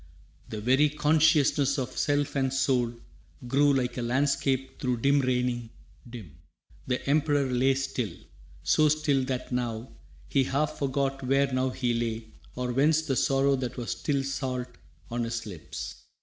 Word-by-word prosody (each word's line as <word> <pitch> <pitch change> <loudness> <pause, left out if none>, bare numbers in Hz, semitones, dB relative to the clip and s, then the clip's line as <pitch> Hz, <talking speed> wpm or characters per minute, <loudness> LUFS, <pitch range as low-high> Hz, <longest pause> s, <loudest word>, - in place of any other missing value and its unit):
The 110 - -5
very 130 +6 +4
consciousness 150 -2 +3
of 130 -1 -3
self 145 0 0
and 135 -1 +1
soul 130 -3 +1 0.6
Grew, 145 +3 +4
like 130 -2 0
a - - -1
landscape 135 +1 0
through 125 -2 0
dim 140 +2 +4
raining, 125 -2 0 0.4
dim. 100 - -10 0.5
The 125 +1 -2
Emperor 145 0 +2
lay 130 +2 +3
still, 135 0 -2 0.5
so 155 -1 +4
still 145 -3 +2
that 130 -1 -4
now 120 -1 -3 0.4
He 135 -2 +2
half 145 +3 -1
forgot 135 0 -1
where 135 +1 +1
now 130 0 +1
he 125 -1 -1
lay, 115 -1 -3 0.2
or 125 0 -2
whence 155 +4 +3
The 140 -4 -1
sorrow 135 +1 +3
that 125 -1 -4
was 120 -2 -3
still 140 -2 -1
salt 130 -2 -3 0.4
on 120 0 -1
his 115 -1 -3
lips. 90 -7 -7
135 Hz, 150 wpm, -28 LUFS, 125-140 Hz, 0.6 s, very